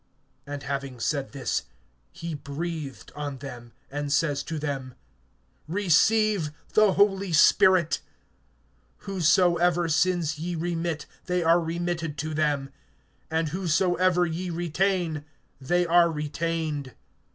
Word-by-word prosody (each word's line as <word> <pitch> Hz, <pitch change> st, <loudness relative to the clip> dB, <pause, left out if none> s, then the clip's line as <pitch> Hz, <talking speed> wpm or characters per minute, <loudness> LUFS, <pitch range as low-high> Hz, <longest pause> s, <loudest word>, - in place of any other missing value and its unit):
(22)And 145 Hz, -1 st, -6 dB
having 135 Hz, -2 st, -4 dB
said 140 Hz, +2 st, -1 dB
this, 135 Hz, -2 st, -2 dB, 0.5 s
he 170 Hz, -, -6 dB
breathed 150 Hz, 0 st, -6 dB
on 145 Hz, -2 st, -4 dB
them, 120 Hz, -3 st, -9 dB, 0.2 s
and 145 Hz, 0 st, -3 dB
says 145 Hz, -1 st, +1 dB
to 160 Hz, +2 st, -5 dB
them: 135 Hz, -4 st, -4 dB, 0.7 s
Receive 205 Hz, +1 st, +3 dB, 0.2 s
the 215 Hz, -3 st, +5 dB
Holy 195 Hz, -1 st, +2 dB
Spirit. 170 Hz, +1 st, +5 dB, 1.0 s
(23)Whosesoever 175 Hz, -2 st, +3 dB
sins 160 Hz, -2 st, +1 dB
ye 175 Hz, +2 st, -3 dB
remit, 165 Hz, -1 st, -2 dB, 0.2 s
they 180 Hz, -1 st, 0 dB
are 165 Hz, +1 st, +5 dB
remitted 165 Hz, -2 st, -3 dB
to 155 Hz, 0 st, -3 dB
them; 145 Hz, -3 st, 0 dB, 0.6 s
and 160 Hz, 0 st, 0 dB
whosesoever 180 Hz, +1 st, +2 dB
ye 175 Hz, +2 st, -3 dB
retain, 175 Hz, -1 st, 0 dB, 0.4 s
they 175 Hz, +6 st, +1 dB
are 170 Hz, 0 st, +5 dB
retained. 155 Hz, -2 st, -3 dB
165 Hz, 110 wpm, -26 LUFS, 145-175 Hz, 1.0 s, the